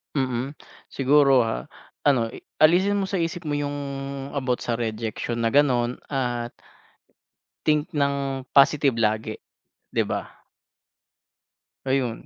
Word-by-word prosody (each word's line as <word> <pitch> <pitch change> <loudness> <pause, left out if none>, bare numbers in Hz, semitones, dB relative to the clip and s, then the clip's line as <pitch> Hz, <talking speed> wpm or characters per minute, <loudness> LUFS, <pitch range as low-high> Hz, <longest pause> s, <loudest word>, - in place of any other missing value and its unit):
Mm, 130 +1 -1 0.3
siguro, 135 -2 +4
ah, 60 - -3 0.4
ano 120 -5 +3 0.3
alisin 185 +6 +5
mo 200 - +1
sa 190 0 -2
isip 165 +1 -2
mo 150 - -3
yung 145 0 -2 0.6
about 130 -3 -1
sa 115 -1 -2
rejection 115 +1 -3
na 115 - +2
gano'n 125 -3 +2
at 120 -3 -2 1.1
think 150 0 +2
ng 140 -2 -1
positive 140 -1 +5
lagi, 110 0 0 0.6
'di - - +2
ba? - - -5 1.4
Ayun, 130 -3 -1
135 Hz, 115 wpm, -24 LUFS, 120-145 Hz, 1.4 s, alisin